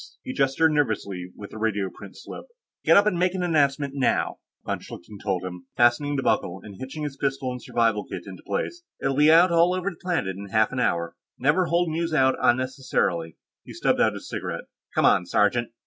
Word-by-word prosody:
He 260 - -5
gestured 160 - +2
nervously 100 -10 -1
with 100 - -10
the - - -9
radioprint 105 -3 -3
slip. - - -9 0.4
"Get - - +6
up 200 - +6
and 185 -5 +1
make 180 +1 +1
an 185 - -1
announcement, 140 -4 +1
now," 135 -2 0 0.3
von - - -2
Schlichten 100 +4 -11
told 95 -3 -1
him, 90 +7 -8
fastening 120 +5 +3
the 135 - -1
buckle 90 +2 0
and 105 -2 -10
hitching 135 +4 -6
his 140 -2 -5
pistol 135 -2 -1
and 125 0 -6
survival 115 -4 0
kit - - -6
into 95 -3 -10
place. 345 - -3 0.2
"It'll 135 0 0
be 150 +2 +6
out 170 +2 +6
all 170 +2 +4
over 185 +2 -2
the - - -14
planet 165 - -2
in 100 +1 -8
half 110 +2 +2
an 125 - -3
hour. 85 -8 0 0.2
Never 150 +7 +2
hold 170 0 +1
news 165 0 -1
out 130 -2 +4
unnecessarily." 130 - 0 0.3
He - - -11
stubbed - - +1
out - - +3
his - - -8
cigarette. - - -4 0.3
"Come - - +3
on, 90 - +4
sergeant." 110 +6 +2
130 Hz, 205 wpm, -25 LUFS, 105-160 Hz, 0.4 s, Get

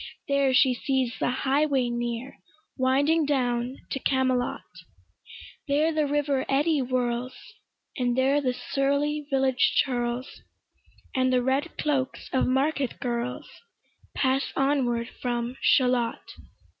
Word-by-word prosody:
There 280 -2 +2
she 255 0 +4
sees 260 -1 -1
the - - +1
highway 270 0 +1
near 240 +1 -4 0.4
Winding 285 +5 +2
down 250 -2 0
to 270 - -2
Camelot: 260 -2 0 1.1
There 300 +3 +2
the 305 -1 +1
river 285 -2 0
eddy 295 +3 +2
whirls, 250 -1 -1 0.6
And 245 -2 0
there 270 +3 +3
the 255 -2 +1
surly 285 +3 -1
village 265 -2 +2
churls, 245 0 -3 0.7
And 255 0 +2
the 250 -1 +2
red 275 +6 -1
cloaks 275 -3 -2
of 260 - +2
market 270 0 0
girls, 240 -1 -3 0.7
Pass 265 0 +1
onward 255 -4 +1
from 240 0 -2
Shalott. 250 -3 +2
260 Hz, 115 wpm, -26 LUFS, 250-280 Hz, 1.1 s, she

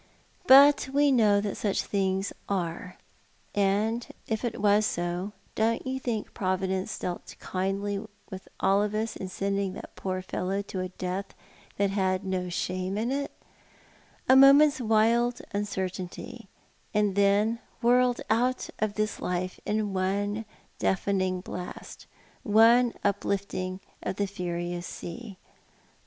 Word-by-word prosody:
But 280 0 +8
we 285 +1 +4
know 215 -5 +4
that 205 -1 -3
such 200 -2 0
things 195 -1 -1 0.2
are. 180 -1 -3 0.6
And 210 +4 +1 0.2
if 220 +1 -2
it 240 - -2
was 205 +1 +4
so, 175 0 -2 0.2
don't 225 +1 0
you 260 0 -2
think 235 -5 -3
Providence 190 0 -1
dealt 175 -1 -5
kindly 195 +2 -2 0.3
with 190 0 -8
all 195 +1 +3
of 210 0 -1
us 220 +1 -2
in 190 - -5
sending 195 0 -1
that - - -10
poor 185 -1 -3
fellow 190 +2 -2
to 195 -1 -6
a 185 0 -3
death 185 +2 -5 0.4
that 200 -1 +1
had 190 -1 0
no 185 -1 -2
shame 185 +2 -2
in 230 +4 -1
it 280 +1 -2 0.5
— - - -30
a 260 - +7
moment's 280 +2 +7
wild 235 +2 +3
i;ncertainty, 200 +3 -4 0.5
and 210 -2 +2
then 200 +3 +3 0.2
whirled 245 +1 +3
out 245 +3 +1
of 215 -2 -1
this 215 0 -1
life 180 +1 -3
in 210 -1 0
one 200 +3 -1 0.3
deafening 190 -1 0
blast, 180 0 -8 0.3
one 230 +3 +5
uplifting 200 -2 -1 0.2
of - - -3
the 200 - 0
furious 175 -2 -4
sea? 200 +3 -8
200 Hz, 135 wpm, -28 LUFS, 185-225 Hz, 0.6 s, But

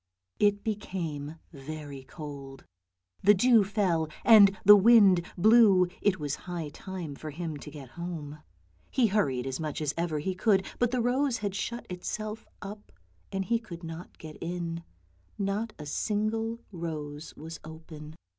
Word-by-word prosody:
It 205 -1 +3
became 170 -8 -4 0.2
very 145 -1 -7
cold, 135 -2 -9 0.6
the 205 +2 +6
dew 230 +2 +5
fell 185 -6 0 0.2
and 200 -4 +8
the 210 +1 +11
wind 200 -4 +6
blew; 200 -2 +6
it 190 -3 +2
was 145 -2 -2 0.2
high 170 -4 -3
time 175 -1 -7
for 155 +2 -7
him 160 +1 -5
to 150 - -9
get 145 -4 -10
home. 155 -2 -6 0.5
He 255 - +2
hurried 165 - +1
as 135 -1 -3
much 155 -2 -3
as 150 -2 -1
ever 165 -2 -1
he 185 +6 -2
could, 190 0 +2
but 245 - +3
the 250 0 0
rose 250 +1 +1
had 205 -3 -3
shut 235 +4 -4
itself 215 +4 -5 0.2
up, 205 +1 -9 0.4
and 195 0 -2
he 230 +2 +1
could 175 -7 -10
not 165 +1 -8
get 155 -1 -10
in, 170 -1 -4 0.3
— - - -37 0.2
not 205 +3 -1
a 150 - -8
single 215 +7 -1
rose 155 -4 -6
was 160 +2 -8
open. 160 -1 -10
180 Hz, 155 wpm, -29 LUFS, 155-210 Hz, 0.6 s, the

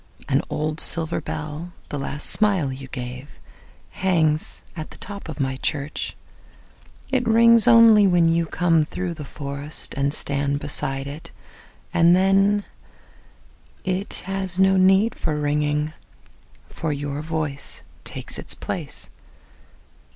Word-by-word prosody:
An - - +2
old 155 +1 -2
silver 165 -1 +3
bell, 155 +3 -6 0.2
the 145 - -4
last 140 +2 -2
smile 190 -11 +2
you 135 0 -9
gave, 125 +1 -8 0.5
Hangs 160 -5 0
at 155 -2 -6
the - - -12
top 200 -4 -7
of 155 - -7
my 130 -1 -1
church.It 155 - -5
rings 230 +1 +7
only 230 -3 +7
when 175 -2 +4
you 165 0 +1
come 165 -1 +2
through 175 +3 -4
the 155 -2 -8
forestAnd 140 0 -3
stand 140 -1 0
beside 135 -1 -2
it. 145 +3 -8 0.6
And 170 +1 +5
then, 195 +2 +3 1.2
it 185 +2 -3
has 190 -1 -3
no 190 0 +4
need 190 +4 +4
for 155 - -3
ringing, 150 +1 0 0.7
For 160 - -4
your 145 0 -3
voice 155 -3 -4 0.2
takes - - -5
its - - -2
place. - - -4
160 Hz, 120 wpm, -23 LUFS, 145-190 Hz, 1.2 s, rings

